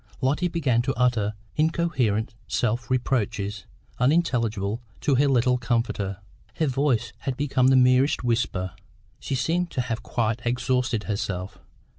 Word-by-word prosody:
Lotty 145 +7 +1
began 145 -9 +1
to 135 +2 -2
utter 115 -4 +1 0.2
incoherent 145 -9 +1
self 120 -1 -1
reproaches, 110 -6 -1 0.3
unintelligible 120 - +1 0.2
to 145 - +2
her 140 +2 +4
little 125 -1 +3
comforter; 115 -5 -1 0.4
her 160 - +1
voice 130 -5 0
had 130 -2 -3
become 135 -3 +2
the 135 - +5
merest 130 +2 +4
whisper; 115 -6 0 0.5
she 135 - -3
seemed 170 +7 0
to 130 - -1
have 120 -2 -3
quite 115 -1 -1
exhausted 125 -1 0
herself. 100 -3 -3
125 Hz, 130 wpm, -25 LUFS, 110-135 Hz, 0.5 s, the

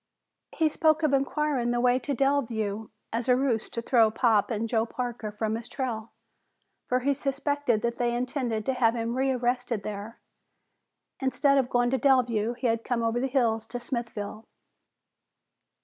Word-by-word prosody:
He 320 - +3
spoke 315 +1 +2
of 300 -2 +2
inquiring 275 -2 +1
the 240 0 +1
way 250 +1 +3
to 280 +1 -3
Delview 225 -6 0 0.2
as 235 +2 -2
a 250 - +6
ruse 250 -4 0
to 230 - -5
throw 230 -3 +4
Pop 220 -2 +2
and 225 -1 -1
Joe 225 -1 +1
Parker 235 -2 -4
from 215 +1 -2
his 230 +1 -6
trail, 235 -4 -4 0.8
for 250 0 +1
he 280 +3 +2
suspected 280 -3 -1
that 235 0 -1
they 240 -1 +1
had 240 - -1
intended 245 -4 -2
to 265 - +1
have 240 -2 +2
him 230 0 -2
rearrested 250 -4 0
there. 210 +2 -6 1.0
Instead 275 +1 +2
of 255 -2 0
going 245 0 +2
to 265 - +1
Delview, 240 -4 +2
he 250 - -5
had 230 -1 +1
come 240 -2 -1
over 230 +1 +1
the 265 - 0
hills 230 -4 +1
to 245 - -4
Smithville. 225 -3 -5
240 Hz, 170 wpm, -27 LUFS, 225-265 Hz, 1.0 s, a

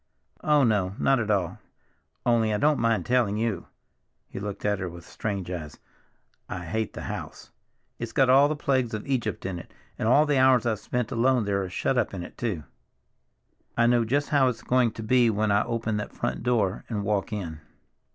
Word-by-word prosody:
"Oh, 150 -2 +4
no, 100 -5 +1
not 135 -2 +3
at 110 -2 -2
all. 95 -5 0 0.7
Only—I 115 -3 +2
don't 150 +6 +2
mind 115 -1 +1
telling 120 -5 +2
you—" 110 -6 -2 0.6
he - - -7
looked 100 0 -5
at 105 -1 +1
her 90 -2 -3
with 85 0 -11
strange 100 -4 -4
eyes—"I 85 +2 -10
hate 110 +6 -2
the - - -7
house! - - -7 0.5
It's - - -4
got 135 - +3
all 135 +3 +6
the 155 - -1
plagues 130 -6 0
of 105 - -6
Egypt 115 -10 -2
in 95 -2 -3
it. 85 - -12 0.3
And - - 0
all 145 +6 +5
the 145 -3 +2
hours 130 -2 +5
I've 110 -3 0
spent 125 -1 -3
alone 125 -1 +2
there 100 -1 0
are 95 - -4
shut 90 - 0
up - - -1
in 90 - -5
it - - -10
too. 100 -10 -3 1.1
I 115 - +4
know 120 0 +4
just 140 +6 0
how 140 -3 +4
it's 125 -2 -3
going 125 -2 +3
to 110 - -7
be 120 +1 +4
when 110 0 +1
I 100 - +3
open 115 -2 -2
that 105 - -5
front - - -3
door 110 -5 0
and 105 -4 -2
walk 100 -1 -1
in." 85 -7 -4
110 Hz, 200 wpm, -26 LUFS, 100-125 Hz, 1.1 s, all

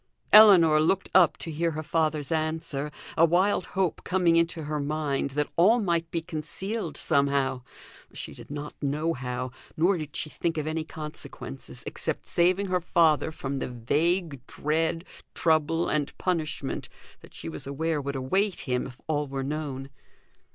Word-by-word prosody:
Ellinor 180 -8 +9
looked 190 +5 +1
up 180 -3 +5
to 165 - -6
hear 165 +2 0
her 155 +1 -4
father's 155 -2 0
answer, 155 -2 -2 0.3
a 165 - +4
wild 180 +4 +3
hope 185 -4 0
coming 180 -2 +2
into 165 -1 +1
her 150 0 -2
mind 145 -1 -1
that 150 - 0
all 210 +8 +6
might 170 -5 0
be 165 -1 -2
concealed 165 +4 -4
somehow; 140 -2 +1 0.5
she - - -7
did - - -13
not 145 +1 -6
know 150 +3 0
how, 125 -1 -4 0.3
nor 175 +3 +3
did 150 -2 -7
she - - -2
think 165 -2 -2
of 155 - -1
any 155 0 -2
consequences 150 - -7
except - - -3
saving 180 +3 +2
her 180 -1 0
father 160 -2 +3
from 140 -3 -4
the - - -3
vague 145 +4 0
dread, 160 +3 -1 0.3
trouble, 165 +1 +2
and 150 -2 -1
punishment 155 -6 -2 0.3
that - - -16
she - - -7
was 80 +8 -6
aware 155 +2 -1
would 140 0 -4
await 190 +10 0
him 125 -1 -1
if 130 -1 -12
all 150 -2 -1
were 135 0 -3
known. 140 -2 -4
155 Hz, 160 wpm, -27 LUFS, 140-170 Hz, 0.5 s, Ellinor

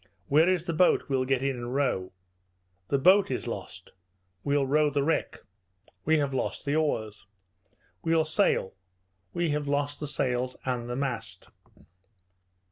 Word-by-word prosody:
"Where 155 +5 +5
is 180 -2 +1
the 170 - -2
boat? 170 -1 +3
We'll 130 -1 +1
get 135 0 0
in 135 -1 0
and 120 +1 -5
row." 125 -10 0 0.8
"The 140 - +1
boat 190 +7 +5
is - - -3
lost." - - -7 0.5
"We'll 140 -1 +1
row 150 +2 +3
the 145 -1 0
wreck." 165 +3 -1 0.6
"We 160 +1 +4
have 140 -2 0
lost 130 - -3
the 145 +1 0
oars." 110 -10 -1 0.8
"We'll 165 -1 +2
sail." 155 - +1 0.6
"We 170 -2 0
have 145 0 -2
lost 145 0 -1
the 150 - -4
sails 125 -3 -1
and 120 -2 -2
the 120 - -2
mast." 135 -3 -4
140 Hz, 150 wpm, -28 LUFS, 130-155 Hz, 0.8 s, Where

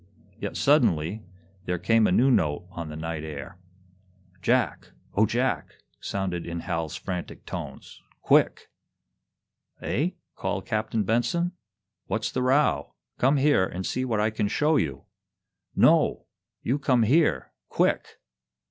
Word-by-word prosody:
Yet, - - -4
suddenly, 85 +7 +3 0.4
there 90 - -1
came 110 +5 +3
a - - +1
new 130 +8 +4
note 75 - +1
on 85 -4 -6
the 75 - -7
night 80 0 -4
air. 75 +2 -7 0.8
"Jack, - - 0 0.2
O 110 +2 +3
Jack!" 125 +4 -1 0.2
sounded 90 -3 -3
in 85 0 -5
Hal's 80 -2 -3
frantic 90 -2 -6
tones. - - -8 0.2
"Quick!" - - +3 1.1
"Eh?" 165 +9 -1 0.2
called - - -3
Captain 110 0 -1
Benson. 145 - +1 0.6
"What's 110 0 -1
the 130 - -1
row? 135 +4 +2 0.2
Come 135 +3 +4
here 145 -7 +4
and 95 0 -4
see 130 - -1
what 115 -5 0
I 110 +1 +2
can 105 -1 -1
show 150 +8 +2
you!" 70 - -1 0.7
"No! - - +4 0.4
You 135 +5 0
come 125 -5 +3
here 150 +8 +2 0.2
quick!" - - 0
110 Hz, 130 wpm, -26 LUFS, 85-130 Hz, 1.1 s, new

